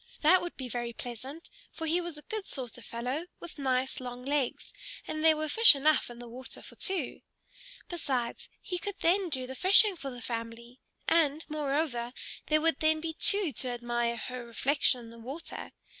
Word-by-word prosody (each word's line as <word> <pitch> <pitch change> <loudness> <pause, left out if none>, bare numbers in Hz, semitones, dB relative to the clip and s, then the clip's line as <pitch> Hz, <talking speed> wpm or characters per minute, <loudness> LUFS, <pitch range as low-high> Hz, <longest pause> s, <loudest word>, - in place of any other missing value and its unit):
That 350 +4 +6
would 350 - -6
be 260 - -4
very 240 0 -3
pleasant, 255 +8 -8 0.2
for 325 - -6
he 335 +3 +2
was 340 -3 -5
a 300 - -9
good 430 -3 -5
sort 255 -4 -3
of - - -13
fellow 255 +8 -3
with 345 -3 -10
nice 260 -1 0
long 250 0 -7
legs; 280 -2 -1 0.3
and 310 0 -3
there 320 -1 +6
were 310 0 -2
fish 445 +4 +8
enough 295 0 +2
in 240 - -10
the 240 0 -9
water 255 +2 -8
for - - -11
two. 380 -2 -2 0.7
Besides, 265 -9 -3
he 360 -1 -3
could 405 0 -4
then 365 +2 +3
do 260 -4 -1
the 260 - -7
fishing 390 - +6
for 280 -5 -6
the 245 -2 -8
family; 230 +1 -6 0.3
and, 315 -2 +2
moreover, 280 -5 -1 0.3
there 310 0 +3
would 325 -3 +2
then 315 0 +3
be 320 0 -3
two 400 0 +4
to 255 - -3
admire 240 -1 -1
her 250 +1 -6
reflection 255 +2 +1
in 230 - -11
the 230 - -13
water. 270 +8 -7
275 Hz, 190 wpm, -30 LUFS, 245-325 Hz, 0.7 s, fish